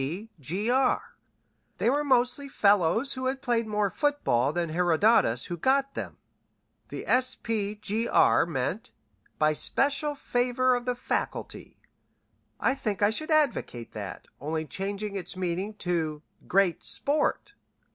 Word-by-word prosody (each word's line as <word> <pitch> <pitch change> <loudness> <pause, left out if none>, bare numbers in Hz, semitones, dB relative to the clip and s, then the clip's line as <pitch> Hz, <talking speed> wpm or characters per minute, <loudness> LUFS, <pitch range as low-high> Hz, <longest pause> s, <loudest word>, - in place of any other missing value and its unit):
B. 180 +12 -5
Sp. 180 - -1
Gr. 255 +2 +3 0.8
they - - 0
were 285 +4 +2
mostly 260 +1 +2
fellows 205 - +3
who 260 0 -3
had 265 +1 -3
played 235 -2 +1
more 210 -2 0
football 285 - +1
than 170 0 -2
Herodotus 170 - +3
who 175 - -5
got 275 - +1
them. - - -6 0.7
The - - -7
Sp. 225 -5 0
Gr. 220 -4 +3
meant 170 - -2 0.5
'by 155 0 +3
special 285 - +1
favor 250 -1 +1
of 245 0 -2
the 250 -1 0
Faculty.' 245 - -4 0.8
I 265 - +2
think 210 -7 -2
I 205 - +5
should 310 +9 -4
advocate 290 - 0
that, - - -7
only 155 +3 -3
changing 200 +3 -4
its 185 -1 -4
meaning 185 +3 -2
to 160 -5 -2 0.2
'Great 190 -2 +2
Sport.'" 295 +2 -1
215 Hz, 135 wpm, -27 LUFS, 175-255 Hz, 0.8 s, I